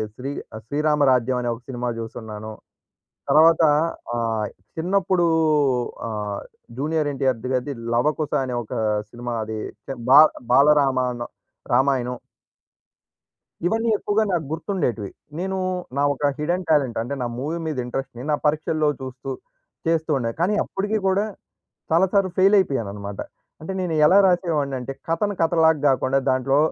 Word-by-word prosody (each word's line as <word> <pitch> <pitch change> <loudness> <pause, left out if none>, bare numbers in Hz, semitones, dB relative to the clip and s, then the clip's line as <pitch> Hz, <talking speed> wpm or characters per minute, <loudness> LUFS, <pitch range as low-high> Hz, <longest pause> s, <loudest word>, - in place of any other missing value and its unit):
శ్రీ 135 +2 -5 0.2
శ్రీ 110 - -6
శ్రీరామరాజ్యం 140 -4 +2
అనే 120 - -1
ఒక 115 - -15
సినిమా 125 -1 -3
చూసున్నాను. 110 -1 -7 0.8
తరువాత 160 +3 +6 0.5
ఆహ్, 115 -2 -1 0.3
చిన్నప్పుడు 185 +1 +1 0.8
ఆహ్, 105 -2 -4 0.4
'జూనియర్ 155 +2 0
ఎన్‌టిఆర్' 130 -3 0
గారిది 130 +3 -1 0.2
'లవకుశ' 150 +5 0
అనే 125 -1 -4
ఒక 105 - -9 0.4
సినిమా 120 +1 -6
అది 110 0 -5 0.5
బా 140 - +9 0.3
బాలరామాణం 130 -3 +3 0.4
రామాయణం. 125 -1 +2 1.5
ఇవన్నీ 225 +5 +1
ఎక్కువగా 210 +2 +1
నాకు 165 -4 0
గుర్తుండేటివి. 160 - -2 0.3
నేను 190 +1 -2 0.4
నా - - +2
ఒక 145 +1 0
హిడెన్ 175 +4 -1
టాలెంట్ 140 -6 +2
అంటే 120 +5 -4
నా 125 - -1
మూవీ 150 +6 -3
మీద 155 -3 -3
ఇంట్రెస్ట్‌ని 125 0 -5
నా - - +4
పరీక్షల్లో 155 +1 +1
చూస్తూ 130 +1 -7 0.6
చేస్తూ 160 -1 +1
ఉండేది. 115 -3 -3
కానీ 185 +4 +2
అప్పటికి 205 +3 -2
కూడా 190 +2 +2 0.7
చాలా 170 +4 +4
సార్లు 195 -2 +2
ఫెయిల్ 195 +2 +6
అయిపోయానన్నమాట. 105 - -2 0.4
అంటే 160 +5 -5
నేను 175 -3 -1
ఎలా 185 +6 +6
రాసేవాడినంటే 145 -8 0 0.2
కథను 200 +5 0
కథలాగా 160 -1 +4
కాకుండా, 135 0 +2
దాంట్లో 130 +2 +2
140 Hz, 125 wpm, -23 LUFS, 125-165 Hz, 1.5 s, బా